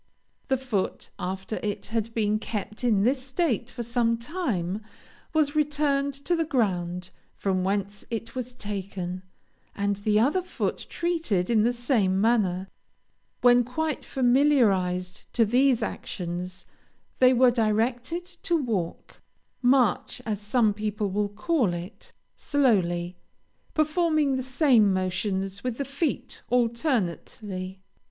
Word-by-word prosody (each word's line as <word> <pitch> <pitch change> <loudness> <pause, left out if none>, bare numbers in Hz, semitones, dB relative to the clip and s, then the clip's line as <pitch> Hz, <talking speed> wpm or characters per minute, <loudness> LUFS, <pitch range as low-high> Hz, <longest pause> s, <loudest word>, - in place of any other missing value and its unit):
The 265 - +2
foot, 240 -7 -3
after 190 +3 -3
it 205 -1 -3
had 225 0 -1
been 215 -1 +1
kept 215 +1 -5
in 215 -5 +3
this 260 +3 +2
state 260 - -1
for 240 - -5
some 235 0 +1
time, 230 - -2 0.5
was 310 -2 +1
returned 290 -2 +1
to 350 - +2
the 330 - +1
ground 180 - -1 0.2
from 185 -2 0
whence 200 +1 -2
it 230 0 -4
was 250 -1 -5
taken, 190 -4 -5 0.5
and 200 0 0
the 210 +1 +2
other 290 +11 +3
foot 365 - -3
treated 320 - 0
in 220 -2 +4
the 235 +3 +3
same 235 -6 +1
manner; 195 -4 +2 0.7
when 245 0 +6
quite 305 +6 -2
familiarized 230 -10 +2
to 230 - +4
these 250 +2 +3
actions, 180 0 -4 0.5
they 255 -1 +7
were 255 0 +5
directed 240 +8 0 0.2
to 345 - +2
walk 215 - -3 0.4
(march, 250 -4 +3
as 215 -2 -2
some 215 0 +2
people 210 -1 -2
will 205 +1 0
call 210 - 0
it) 175 +5 -9 0.2
slowly, 180 - +1 0.6
performing 310 -2 +2
the 260 - -1
same 255 -5 +4
motions 190 +1 -1
with 250 -2 -2
the 280 - -2
feet 280 +2 -2
alternately." 210 - -1
225 Hz, 125 wpm, -26 LUFS, 195-265 Hz, 0.7 s, they